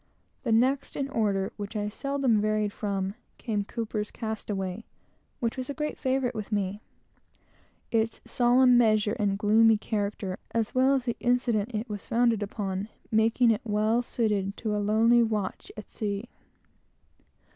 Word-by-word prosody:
The 235 - -2
next 260 +5 +2
in 275 - -1
the 275 - -9
order, 200 -5 0
that 205 +2 -6
I 210 0 -2 0.3
never 275 -1 -1
varied 215 -1 0
from, 195 -2 -2 0.2
came 210 -4 -2
Cowper's 215 -1 -4
Castaway, 210 -2 -4 0.6
which 235 -1 -2
was 255 +1 -4
a 285 - -3
great 300 -1 -2
favorite 260 -2 0
with 215 -1 -6
me; 205 0 -1 1.1
the 225 0 +2 0.2
solemn 245 +1 +4
measure 215 -2 +3
and 200 -2 +1
gloomy 220 +1 +5
character 205 -2 -3
of - - -7
which, - - -42
as 225 -2 0
well 260 +2 +4
as 260 -2 -1
the 235 - -2
incident 245 -2 +1
that 215 - 0
it 235 - -9
was 205 -2 -6
founded 235 -2 +2
upon, 200 -1 -3 0.2
made 220 +2 +2
it 230 -4 +4
well 215 +1 +1
suited 210 -5 -1
to 215 -2 -2
a 210 - 0
lonely 225 +3 +4
watch 215 -4 -2
at 215 - -8
sea. 210 +2 -4
220 Hz, 165 wpm, -27 LUFS, 205-240 Hz, 1.1 s, gloomy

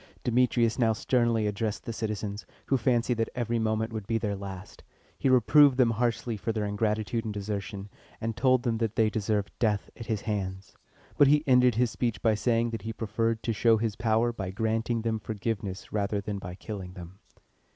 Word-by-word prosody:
Demetrius 120 -1 +2
now 115 -2 +4
sternly 115 -1 +1
addressed 105 +1 -2
the 115 - -4
citizens, 105 -2 -4 0.2
who 135 - +1
fancied 120 -1 +1
that 115 - +1
every 120 -1 -1
moment 110 +1 -1
would 110 -3 -5
be 115 - +1
their 105 -3 -2
last. 95 -1 -9 0.3
He 135 - 0
reproved 130 +2 +6
them 125 -3 +4
harshly 115 0 -1
for 115 - -2
their 110 -2 -2
ingratitude 110 +2 -1
and 110 - -4
desertion, 100 -1 -4 0.3
and 115 0 -3
told 130 0 +3
them 115 -3 0
that 115 -2 -1
they 110 -1 +3
deserved 105 -1 -1
death 105 -3 0
at 115 - -9
his 110 -3 -1
hands; 100 -2 -4 0.5
but 145 - +8
he 150 +1 +4
ended 125 -3 +5
his 120 0 +2
speech 115 -5 -2
by 110 - +4
saying 115 +1 +1
that 115 - -4
he 110 - -4
preferred 115 +1 -1
to 115 - 0
show 115 +1 +4
his 110 -1 -1
power 115 +1 +1
by 95 -5 -4
granting 110 +3 -1
them 110 -1 -1
forgiveness 100 -3 -4
rather 100 -1 0
than 100 0 -4
by 90 -1 -7
killing 95 -3 -7
them. 90 +1 -11
110 Hz, 195 wpm, -28 LUFS, 105-115 Hz, 0.5 s, but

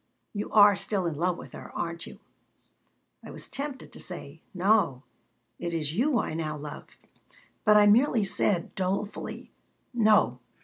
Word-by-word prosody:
You 205 -1 -4
are 205 -1 +7
still 195 -1 -1
in 170 - -1
love 175 +3 0
with - - -10
her, - - -10
aren't 170 -1 -4
you?" - - -11 1.1
I - - -10
was - - -7
tempted 275 -1 -6
to - - -11
say: 165 -3 -8
"No. 185 -8 +2 0.6
It 170 -1 -3
is 155 -2 -1
you 255 - +2
I 210 - -1
now 155 -1 -3
love." 145 0 -8 0.8
But 210 -1 +7
I 210 - +7
merely 230 +2 +4
said, 190 -2 0
dolefully: 195 +2 -3 0.4
"No. 215 - +4
190 Hz, 150 wpm, -28 LUFS, 165-210 Hz, 1.1 s, are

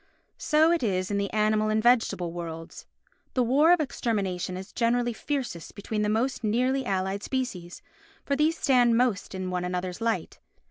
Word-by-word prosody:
So 315 +2 +3
it 345 - +1
is 185 -4 -1
in 200 - 0
the 200 -1 -2
animal 215 0 +2
and 215 - +1
vegetable 225 -8 +2
worlds. 165 -1 -7 0.5
The 255 - +3
war 285 +8 +4
of 355 - +5
extermination 195 - -2
is 190 +2 -9
generally 240 0 +1
fiercest 250 - -4
between 210 +1 -3
the 210 - +1
most 235 +4 0
nearly 250 +4 +1
allied 190 +1 -1
species, 200 -11 -4 0.4
for 280 - 0
these 310 +3 +2
stand 245 -4 +3
most 235 -6 0
in 185 -1 -4
one 180 -1 -2
another's 180 +2 -3
light. 230 -1 -2
220 Hz, 170 wpm, -27 LUFS, 185-255 Hz, 0.5 s, of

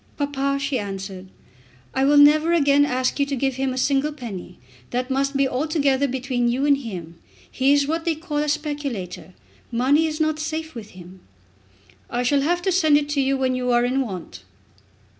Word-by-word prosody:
"Papa," 275 -1 -1
she 280 -2 -1
answered, 195 -2 -6 0.7
"I 265 - +1
will 290 +1 +4
never 305 +3 +6
again 285 -3 +4
ask 255 0 -1
you 280 - +3
to 280 - -2
give 270 0 -1
him 265 0 0
a 255 - -5
single 275 +3 +1
penny. 210 -11 -8 0.3
That 250 +2 -2
must 275 +1 0
be 275 -1 +3
altogether 280 0 +1
between 255 -1 -1
you 255 +4 0
and 285 -1 +5
him. 175 -9 -8 0.3
He 270 +1 +2
is 285 0 +4
what 325 +3 -2
they 330 -2 0
call 310 -1 -5
a 300 0 0
speculator. 285 - -4 0.4
Money 275 +7 +3
is 305 0 -4
not 310 -1 0
safe 315 +1 -4
with 215 -6 -10
him." 180 +1 -12 0.9
"I 245 +1 -1
shall 275 +3 +2
have 350 +5 0
to 380 - +1
send 315 -5 +4
it 295 0 -2
you 275 -1 +1
when 260 -1 0
you 250 0 -2
are 240 0 +3
in 260 +2 +1
want." 180 - -6
275 Hz, 190 wpm, -22 LUFS, 245-295 Hz, 0.9 s, never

